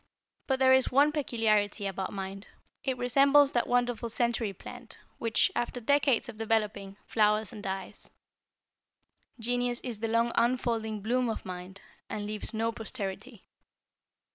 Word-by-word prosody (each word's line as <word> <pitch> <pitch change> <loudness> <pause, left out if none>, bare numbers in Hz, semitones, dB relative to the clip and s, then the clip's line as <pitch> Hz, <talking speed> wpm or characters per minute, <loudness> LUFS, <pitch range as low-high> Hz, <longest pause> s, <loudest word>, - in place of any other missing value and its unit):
But 265 - +2
there 260 0 +5
is 260 -1 +3
one 285 +3 +5
peculiarity 220 -8 +1
about 195 -1 -3
mind. 195 +1 -6 0.4
It 265 -2 -1
resembles 275 +3 +5
that 240 - +1
wonderful 245 -1 0
century 235 -2 0
plant 235 +5 -10 0.2
which, 230 -1 +2
after 240 +1 -2
decades 275 0 +2
of 225 -3 -9
developing, 210 -3 -1
flowers 210 -1 +2
and 210 - -8
dies. 190 0 -3 1.3
Genius 245 +1 0
is 240 -5 -5
the 225 - -1
long 230 +1 +2
unfolding 230 -3 0
bloom 245 +3 +1
of 220 - -4
mind, 185 +1 -8 0.3
and 205 - -4
leaves 210 0 -4
no 225 0 0
posterity. 225 0 -6
230 Hz, 140 wpm, -29 LUFS, 210-245 Hz, 1.3 s, there